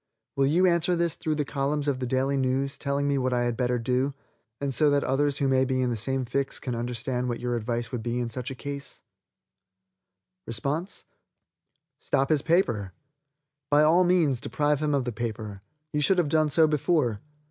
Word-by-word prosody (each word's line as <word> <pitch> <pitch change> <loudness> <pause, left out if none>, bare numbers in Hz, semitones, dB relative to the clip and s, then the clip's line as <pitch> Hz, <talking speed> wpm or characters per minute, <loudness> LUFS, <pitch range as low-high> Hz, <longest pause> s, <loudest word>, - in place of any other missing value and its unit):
Will 135 0 +3
you 175 +6 +3
answer 175 0 +3
this 170 -2 0
through 155 -1 -2
the 150 -1 -1
columns 145 +1 -1
of 135 -3 0
the 125 - -2
Daily 130 +2 +1
News 135 +1 0
telling 140 0 -1
me 140 -1 +1
what 130 -1 0
I 120 0 +1
had 120 -1 0
better 125 0 0
do, 125 +3 0 0.4
and 140 -1 -2
so 150 +4 +3
that 145 0 +2
others 140 +1 +1
who 140 - +1
may 130 0 +3
be 130 0 0
in 125 -1 +1
the - - -1
same 130 +4 -1
fix 135 +3 -2
can 125 - -4
understand 125 +1 -2
what 120 - -3
your 120 0 -1
advice 120 0 -2
would 125 - -3
be 120 +2 -2
in 120 - -1
such 120 +2 -5
a 135 - -6
case?" 140 +1 -7 1.5
Stop 140 - -5
his 150 -3 +3
paper. 120 - +1 0.8
By 145 +1 +5
all 165 +4 +5
means 165 -9 +2
deprive 145 +4 0
him 150 -1 +1
of 135 -3 0
the 125 - -2
paper. 110 -3 -5 0.3
You 150 - +1
should 185 +6 +3
have 170 -5 +2
done 155 0 +3
so 160 +2 +5
before. 150 - +1
135 Hz, 195 wpm, -27 LUFS, 125-150 Hz, 1.5 s, By